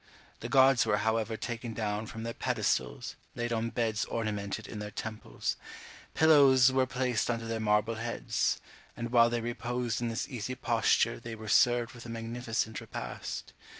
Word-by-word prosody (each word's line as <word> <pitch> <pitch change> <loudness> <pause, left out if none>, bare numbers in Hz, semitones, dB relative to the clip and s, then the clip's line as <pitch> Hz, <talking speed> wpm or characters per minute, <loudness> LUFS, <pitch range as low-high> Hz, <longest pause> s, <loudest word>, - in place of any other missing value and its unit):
The - - -5
gods 135 -1 +6
were 105 - +2
however 110 +1 0
taken 120 -1 -5
down 105 0 -2
from 110 +1 -7
their 115 0 -3
pedestals, 60 - -1 0.2
laid 120 0 -2
on 115 0 0
beds 115 -2 0
ornamented 105 -1 -3
in 105 - -7
their 105 0 -5
temples; 110 +1 -4 0.6
pillows 140 -5 +6
were 130 0 +2
placed 125 -3 0
under 115 -1 -1
their 115 0 -2
marble 105 +1 +2
heads; 115 0 -1 0.4
and 115 0 -4
while 120 -1 +6
they 120 0 -1
reposed 120 -1 -2
in 120 - 0
this 115 +2 -2
easy 125 0 -4
posture 115 -1 +2
they 115 -1 -7
were 110 0 -9
served 120 +1 +4
with 120 -1 -10
a - - -8
magnificent 115 -1 -3
repast. - - -6
115 Hz, 165 wpm, -30 LUFS, 110-120 Hz, 0.6 s, gods